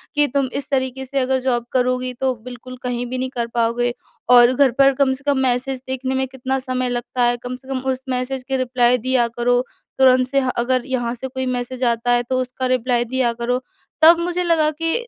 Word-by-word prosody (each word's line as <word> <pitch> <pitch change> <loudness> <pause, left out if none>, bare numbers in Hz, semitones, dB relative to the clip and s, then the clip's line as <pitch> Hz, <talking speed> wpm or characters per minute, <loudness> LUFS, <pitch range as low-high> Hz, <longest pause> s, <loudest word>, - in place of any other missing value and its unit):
कि, 295 0 +3
"तुम 275 -1 0
इस 280 0 -4
तरीके 265 -1 -1
से 275 +1 -2
अगर 260 0 +1
जॉब 245 -2 -1
करोगी, 255 0 0
तो 260 +1 -1
बिल्कुल 255 0 -9
कहीं 245 -1 -2
भी 255 +1 -4
नहीं 260 0 -2
कर 235 -1 -1
पाओगे 240 +1 +1 0.4
और 245 0 +7
घर 270 0 +4
पर 275 0 +6
कम 265 -1 +2
से 265 +2 -9
कम 275 - 0
मैसेज 255 +2 -1
देखने 260 0 -2
में 265 0 0
कितना 265 +1 -3
समय 255 -1 -2
लगता 245 0 -2
है? 240 0 +2
कम 250 0 -4
से 260 +1 -16
कम 270 -1 -2
उस 260 0 -5
मैसेज 255 +1 -2
के 265 - +1
रिप्लाय 250 -1 +2
दिया 250 0 +1
करो। 245 +1 +3 0.4
तुरंत 255 -1 +5
से 275 +2 +1
ह 260 - -1
अगर 250 +1 +1
यहाँ 245 -3 -2
से 265 +2 -6
कोई 260 0 -4
मैसेज 250 0 -3
आता 235 0 +1
है, 240 0 +3
तो 255 +1 -1
उसका 255 +1 -4
रिप्लाय 245 -1 0
दिया 250 -1 0
करो।" 240 +2 -2 0.4
तब 330 +2 +8
मुझे 355 +1 -1
लगा 325 -3 +3
कि 330 0 +1
255 Hz, 225 wpm, -20 LUFS, 245-265 Hz, 0.4 s, तब